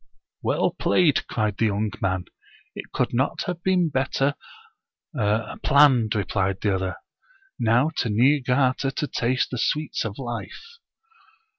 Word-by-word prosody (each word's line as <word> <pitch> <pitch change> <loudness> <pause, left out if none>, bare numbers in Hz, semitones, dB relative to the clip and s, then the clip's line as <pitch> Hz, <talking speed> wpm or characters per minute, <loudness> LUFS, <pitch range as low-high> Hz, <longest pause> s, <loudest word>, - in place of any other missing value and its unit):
"Well - - +1
played!" 165 -6 +2
cried 110 -3 -1
the 115 - +2
young 105 +1 -1
man. 95 -2 -1 0.3
" - - -29
It - - -8
could - - -1
not 130 +3 0
have 175 -1 -4
been 180 -2 +2
better 135 0 0 0.8
planned," 115 +1 +3
re 100 - +1
plied 95 -1 -1
the 105 -2 0
other. 95 -1 -2 0.4
" - - -33 0.2
Now 120 +7 +3
to 115 - 0
Niigata 130 +3 +2
to 135 +2 -3
taste 130 -1 -1
the 125 - -3
sweets 150 +4 -1
of 105 -2 -5
life." 135 - -7
125 Hz, 145 wpm, -24 LUFS, 105-145 Hz, 0.8 s, planned